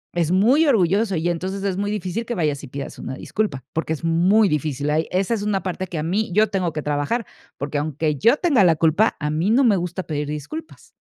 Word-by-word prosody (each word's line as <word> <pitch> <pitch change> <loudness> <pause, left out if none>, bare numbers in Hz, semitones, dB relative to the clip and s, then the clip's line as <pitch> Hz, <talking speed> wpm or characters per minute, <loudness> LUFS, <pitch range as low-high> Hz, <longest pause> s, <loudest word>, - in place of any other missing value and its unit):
es 170 -1 +1
muy 245 - +4
orgulloso 195 - +2
y, 160 +2 -1
entonces, 185 +3 -3
es 195 -2 -1
muy 205 +2 -2
difícil 210 +1 -3
que 240 - -3
vayas 150 -6 -1
y - - -7
pidas 135 +2 -7
una 130 - -5
disculpa, 170 - -3
porque 160 0 -1
es 160 - -7
muy 180 +6 +4
difícil. 150 -3 -1
Ay, 155 +2 +1
esa 190 +5 0
es 220 - -1
una 205 -2 -1
parte 185 0 -3
que 170 - -6
a 150 - -2
mí 200 +7 -1
yo 215 +3 +4
tengo 185 -4 -1
que 150 0 -5
trabajar, 150 +11 -1 0.3
porque 145 +1 -2
aunque 150 0 -1
yo 230 - +4
tenga 285 - +3
la 170 -3 +5
culpa, 165 +8 +2
a 150 -1 -2
mí 160 +6 0
no 250 +5 +4
me 225 -5 +4
gusta 180 0 -3
pedir 150 -2 -3
disculpas. 150 - -7
180 Hz, 235 wpm, -22 LUFS, 155-210 Hz, 0.3 s, la